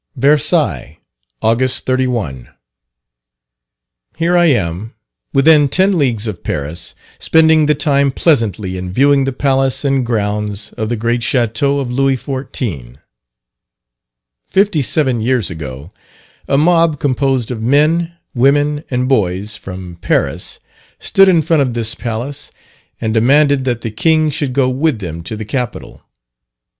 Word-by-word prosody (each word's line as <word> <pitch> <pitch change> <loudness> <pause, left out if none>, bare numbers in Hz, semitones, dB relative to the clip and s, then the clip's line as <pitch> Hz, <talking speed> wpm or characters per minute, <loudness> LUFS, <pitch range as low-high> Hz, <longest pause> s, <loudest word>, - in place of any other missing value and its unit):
_ - - -8
VERSAILLES, 150 - +1 0.5
August 125 +3 +2
31. 120 - -2 1.7
Here 170 +2 +1
I 175 0 +4
am, 100 - -1 0.4
within 145 +1 +4
ten 190 +6 +2
leagues 120 -9 0
of 105 -6 -6
Paris, 75 +3 -4 0.2
spending 160 -1 +4
the 150 - +3
time 140 -1 +1
pleasantly 110 - 0
in 90 0 -6
viewing 140 +5 +3
the 135 - -1
palace 135 +1 0
and 135 -2 +1
grounds 105 -2 -3
of 110 -1 -4
the 120 - -1
great 120 +2 -1
Chateau 120 +4 0
of 135 -3 -3
Louis 135 +1 +1
XIV. 120 - -5 1.5
Fifty 195 -5 +1
seven 130 -3 +1
years 120 -4 0
ago, 75 0 -8 0.6
a 140 - +1
mob, 165 -1 +3
composed 135 -3 0
of 115 -3 -5
men, 155 +7 +2 0.2
women, 145 +3 +2
and 125 0 -1
boys, 105 -4 0
from 90 -4 -9
Paris, - - -1 0.4
stood 195 0 +4
in 170 -4 +3
front 160 0 +2
of 125 -3 -1
this 115 -2 0
palace 120 +5 -5 0.5
and 110 -1 -2
demanded 140 +4 +3
that 120 -3 -1
the 115 - -4
king 155 +6 +2
should 140 -3 -2
go 135 -1 +2
with 135 +1 0
them 85 -5 -6
to 85 +6 -6
the 110 0 -6
capital. 125 +2 -5
130 Hz, 135 wpm, -15 LUFS, 110-145 Hz, 1.7 s, I